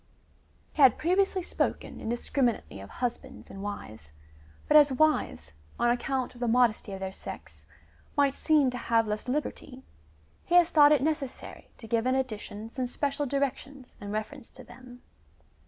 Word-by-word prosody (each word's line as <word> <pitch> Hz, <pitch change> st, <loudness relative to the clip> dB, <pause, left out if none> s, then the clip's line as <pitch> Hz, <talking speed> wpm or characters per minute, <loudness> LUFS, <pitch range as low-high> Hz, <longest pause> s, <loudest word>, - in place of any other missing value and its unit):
He -, -, -1 dB
had 260 Hz, -5 st, +7 dB
previously 375 Hz, +2 st, +1 dB
spoken -, -, -2 dB
indis 235 Hz, +2 st, -5 dB
criminately 240 Hz, -, 0 dB
of 100 Hz, -, -11 dB
husbands 255 Hz, +2 st, -5 dB
and 195 Hz, -, -9 dB
wives, 110 Hz, -, -7 dB, 0.6 s
but 300 Hz, -, +3 dB
as 295 Hz, -2 st, +7 dB
wives, 260 Hz, -, 0 dB, 0.2 s
on 240 Hz, 0 st, +2 dB
account 255 Hz, +1 st, -2 dB
of 245 Hz, -, -15 dB
the 240 Hz, -, -1 dB
modesty 230 Hz, -3 st, +2 dB
of 190 Hz, -, -6 dB
their 190 Hz, 0 st, -4 dB
sex, -, -, -10 dB, 0.5 s
might 280 Hz, -2 st, +3 dB
seem 295 Hz, -5 st, +2 dB
to 250 Hz, -, -5 dB
have 230 Hz, -1 st, +2 dB
less 210 Hz, +3 st, -4 dB
liberty, 265 Hz, -1 st, -4 dB, 0.6 s
he 350 Hz, -, 0 dB
has 350 Hz, -1 st, +6 dB
thought 295 Hz, -2 st, +7 dB
it 290 Hz, -3 st, +4 dB
necessary 300 Hz, -4 st, -4 dB
to 230 Hz, -, -12 dB
give 230 Hz, +1 st, 0 dB
in 255 Hz, -, +2 dB
addition 220 Hz, -3 st, -4 dB
some 255 Hz, 0 st, -3 dB
special 280 Hz, +3 st, -2 dB
directions 275 Hz, -1 st, -3 dB
in 205 Hz, -, -7 dB
reference 225 Hz, +5 st, -5 dB
to 255 Hz, -, -14 dB
them. 245 Hz, 0 st, -14 dB
255 Hz, 165 wpm, -28 LUFS, 225-285 Hz, 0.6 s, had